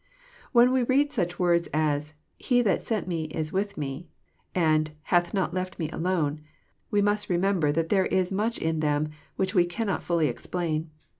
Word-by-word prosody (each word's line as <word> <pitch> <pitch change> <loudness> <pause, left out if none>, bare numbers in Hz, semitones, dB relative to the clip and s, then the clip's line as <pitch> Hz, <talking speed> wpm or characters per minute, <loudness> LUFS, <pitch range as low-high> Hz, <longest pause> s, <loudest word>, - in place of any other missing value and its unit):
When 245 0 +6
we 260 0 +3
read 275 +4 +2
such 175 -8 -1
words 170 -1 +2
as 150 0 0
" - - -46
he 245 -1 +5
that 200 - +2
sent 220 -5 -2
Me 165 -3 -2
is 155 0 -4
with 200 +1 -1
Me," 145 +3 -5 0.5
and 155 -3 +3
hath 175 0 +2
not 190 -4 -1
left 185 0 -3
Me 160 -2 -3
alone," 160 -4 -1 0.5
we 205 -2 +2
must 205 0 +1
remember 180 -4 +2
that 165 +2 -1
there 190 -2 +3
is 185 0 +1
much 215 +4 0
in 160 -1 -1
them 150 0 +1 0.3
which 190 +1 -1
we 180 -4 +5
cannot 195 +3 -2
fUUy 170 -3 +1
explain. 160 +4 -2
175 Hz, 180 wpm, -27 LUFS, 155-200 Hz, 0.5 s, When